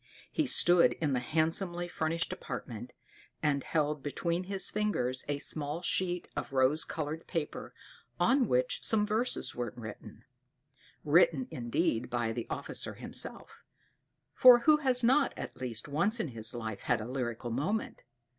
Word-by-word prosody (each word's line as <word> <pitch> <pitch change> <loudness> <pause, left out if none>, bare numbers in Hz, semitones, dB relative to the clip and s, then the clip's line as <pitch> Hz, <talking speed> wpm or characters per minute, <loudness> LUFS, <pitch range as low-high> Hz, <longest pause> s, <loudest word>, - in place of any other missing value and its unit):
He 310 -3 0
stood 175 -7 +5
in 150 -4 -1
the 125 - +1
handsomely 165 +6 0
furnished 165 0 -2
apartment, - - -7 0.5
and 140 -2 +1
held 150 -2 -1
between 170 +5 -2
his 195 0 +1
fingers 130 -12 0
a 145 -1 -1
small 150 +3 0
sheet 180 -1 -1
of 135 -3 -5
rose 135 +4 +3
colored 155 +1 -5
paper, 160 -3 -4 0.5
on 250 +8 +3
which - - +1
some 215 -3 +3
verses 220 +4 0
were - - -4
written - - -10 0.8
written 375 - +4
indeed 120 -1 -1
by 120 -2 -1
the 115 0 -5
officer - - -5
himself; - - -5 0.7
for 245 -1 +8
who 305 +4 +5
has 260 -4 +1
not, 265 +4 +3
at - - -6
least 120 -1 -4
once 175 +11 +1
in 170 - -2
his 115 -1 -3
life, 110 -3 -5
had 120 -2 +1
a 110 - -5
lyrical 120 -2 -4
moment? 175 - -2
160 Hz, 145 wpm, -31 LUFS, 130-210 Hz, 0.8 s, for